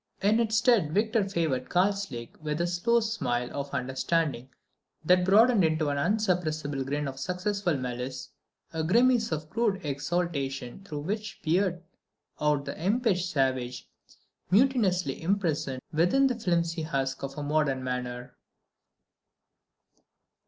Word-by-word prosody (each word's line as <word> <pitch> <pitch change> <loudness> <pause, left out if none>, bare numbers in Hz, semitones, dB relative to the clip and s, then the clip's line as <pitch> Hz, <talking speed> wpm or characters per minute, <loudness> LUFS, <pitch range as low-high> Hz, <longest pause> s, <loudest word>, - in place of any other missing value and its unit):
In 210 +3 +4
its 220 -1 +1
stead 225 - +3
Victor 215 -1 +1
favoured 155 -9 -1
Karslake 185 - -1
with 150 0 -2
a 170 - +1
slow 205 +7 +2
smile 125 - -2
of 140 0 -3
understanding 135 +1 -1 0.6
that 180 +2 +5
broadened 215 +3 +5
into 155 -2 +1
an 145 0 -1
insuppressible 155 -7 0
grin 145 +2 -2
of 135 0 -6
successful 180 +1 -1
malice, 125 0 -5 0.4
a 160 -1 -1
grimace 235 +5 +3
of 155 -1 -3
crude 215 -2 +1
exultation 140 -1 -2
through 150 -6 -6
which 210 +5 -4
peered 175 +2 +1 0.6
out 150 -1 +1
the - - -6
impish 200 -3 +1
savage 130 -5 -1 0.6
mutinously 195 - +2
imprisoned 160 -8 -1
within 185 - +3
a - - -1
flimsy 170 -4 0
husk 135 -4 -2
of 135 +1 -6
modern 145 -2 0
manner. 125 0 -4
165 Hz, 125 wpm, -28 LUFS, 140-200 Hz, 0.6 s, that